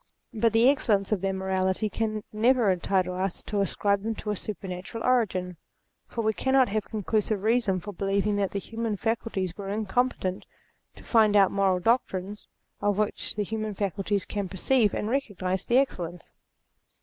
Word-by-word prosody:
But 225 +1 +2
the 230 +2 +5
excellence 215 -8 +2
of 205 -4 +1
their 195 0 0
morality 190 +2 0
can 215 0 -2
never 230 -1 +3
entitle 185 0 0
us 185 0 -3
to 205 -2 -1
ascribe 200 +1 +1
to - - -10
them 215 -1 -4
a - - -3
supernatural 190 +2 -6
origin: 185 -8 +1 0.5
for 230 - -3
we 220 0 +2
cannot 265 +4 +3
have 215 0 -1
conclusive 215 -1 -1
reason 220 -4 +2
for 205 +3 -8
believing 200 +2 0
that 200 -2 +1
the - - -4
human 225 +1 -3
faculties 210 -5 -2
were 195 -1 -6
incompetent 210 -2 -1 0.5
to - - -14
find 220 -3 +4
out 195 -2 +6
moral 195 -2 +2
doctrines 205 -2 -1 0.3
of 205 -1 +1
which 215 0 -2
the 210 - 0
human 215 0 -3
facul 195 -1 -2
ties 200 -1 0
can 200 -3 -3
perceive 210 +3 +2
and 210 - -2
recognize 195 -7 -2
the 240 - +3
excellence. 175 -10 -1
205 Hz, 170 wpm, -27 LUFS, 190-225 Hz, 0.5 s, out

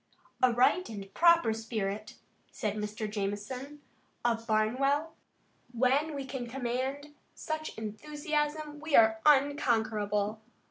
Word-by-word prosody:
"A 255 - +5
right 255 +10 +3
and 195 -3 -8
proper 335 -9 +5
spirit," 215 -2 -4 0.4
said 210 -2 -2
Mr. 215 +1 -4
Jamison, 215 +8 -5 0.4
of 230 -1 0
Barnwell. 275 +8 +1 0.6
"When 270 +6 +2
we 275 -1 -4
can 260 -2 -5
command 265 +4 -3 0.2
such 310 0 -5
enthusiasm 295 +6 -3
we 310 -1 0
are 220 -1 +6
unconquerable. 220 -7 +2
245 Hz, 105 wpm, -30 LUFS, 215-290 Hz, 0.6 s, are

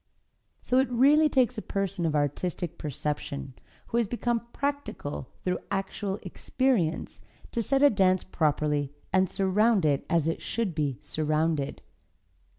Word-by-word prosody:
So 255 - +3
it 265 - +2
really 285 +6 +5
takes 250 -6 +2
a - - -5
person 195 -4 -2
of 155 - -1
artistic 150 +4 -2
perception, 145 -1 -4 0.4
who 235 - 0
has 235 -3 +2
become 235 +1 -1
practical 280 - -3
through 180 0 0
actual 195 0 -2
experience, 200 -2 -1 0.3
to 235 - 0
set 275 +4 +2
a 290 - +9
dance 190 -3 +3
properly 150 -4 0 0.2
and 190 -1 +4
surround 200 0 +2
it 145 -2 +2
as 165 -3 +2
it 165 - -1
should 225 -6 -2
be 145 -5 -1
surrounded. 155 -1 -1
185 Hz, 140 wpm, -28 LUFS, 155-235 Hz, 0.4 s, a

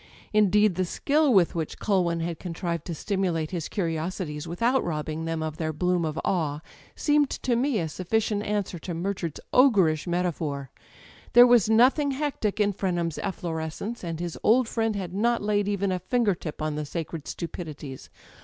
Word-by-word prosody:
Indeed, 210 -1 +4
the 185 - 0
skill 290 - +2
with 190 -7 +4
which 160 -2 -3
Culwin 175 -5 +1
had 165 -1 -3
con 175 -3 -6
trived 170 -3 -3
to 170 - -4
stimulate 175 -4 -1
his 170 -4 -3
curiosities 165 -3 -3
without 235 +10 +1
robbing 155 0 -3
them 165 -1 -2
of 155 -1 -4
their 160 -1 -1
bloom 180 +2 0
of 155 0 -3
awe 155 -5 0 0.3
seemed 295 -2 +2
to 245 - -1
me 255 0 +1
a 170 - 0
suflicient 205 +6 -1
answer 205 -4 -2
to 175 +1 -5
Murchard's 175 -2 -3
ogreish 190 - +4
metaphor. 160 -6 -2 0.6
There 245 +1 +10
was 240 -4 +5
nothing 255 +6 +4
hectic 265 -8 -2
in 205 -1 +2
Frenham's 175 -4 -1
efflorescence, 170 +6 -4
and 165 -2 -4
his 175 -1 -4
old 240 +2 +4
friend 225 -1 0
had 185 -3 -4
not 235 +3 +1
laid 205 -1 +1
even 200 -1 0
a 185 - -1
finger 220 +2 +1
tip 155 -3 -6
on 155 -1 -1
the 150 0 -3
sacred 165 -1 -5
stupidities. 155 -5 -7
180 Hz, 175 wpm, -26 LUFS, 160-210 Hz, 0.6 s, There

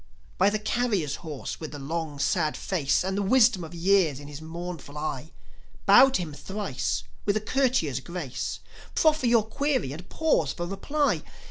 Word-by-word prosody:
By 195 - +6
the 215 - 0
carrier's 210 - 0
horse 155 -5 -6
with 155 -2 -7
the - - -5
long, 155 +1 -4
sad 155 +2 +1
face 155 -7 +1
And 190 +1 -2
the 205 - 0
wisdom 220 -2 +4
of 165 +1 -8
years 170 -5 +3
in 145 - -10
his 145 +1 -8
mournful 160 -3 -7
eye; 150 0 -4 0.5
Bow 270 - +8
to 260 - 0
him 155 -3 -7
thrice 145 - -3 0.2
with 205 +1 +1
a - - +1
courtier's 225 - +1
grace, 155 -3 -5 0.3
Proffer 310 -5 +3
your 230 -2 +4
query, 260 - -1
and 170 +5 -10
pause 300 - +1
for 175 - -4
reply. 280 +11 0
175 Hz, 170 wpm, -27 LUFS, 150-215 Hz, 0.5 s, Bow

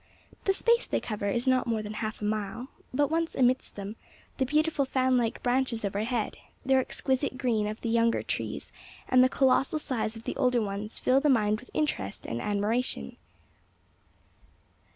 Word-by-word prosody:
The 390 - +4
space 470 +4 +2
they - - 0
cover 205 -2 -3
is 240 +5 -1
not 255 -1 +3
more 225 -2 0
than 210 0 -5
half 215 -1 -4
a - - 0
mile, 215 +4 -2 0.2
but, 290 +3 +1
once 330 0 0
amidst 255 0 +2
them, 205 +2 -6 0.4
the 265 - +1
beautiful 305 +1 +2
fan 260 -1 +2
like 235 -2 0
branches 245 -3 +1
overhead, 215 +3 -1 0.3
the 265 - +3
exquisite 265 0 0
green 225 -5 +1
of 215 +1 -4
the 230 - -2
younger 230 0 +2
trees - - -4 0.4
and 255 0 +6
the 255 - +4
colossal 270 +3 +3
size 250 -7 -2
of 225 - -10
the - - -4
older 250 -3 +3
ones 210 0 -4
fill 260 +1 +4
the 295 - +3
mind 215 -4 +3
with 250 - -15
interest 105 - -2
and 115 +1 -3
admiration. 210 +5 -1
245 Hz, 175 wpm, -28 LUFS, 215-265 Hz, 0.4 s, and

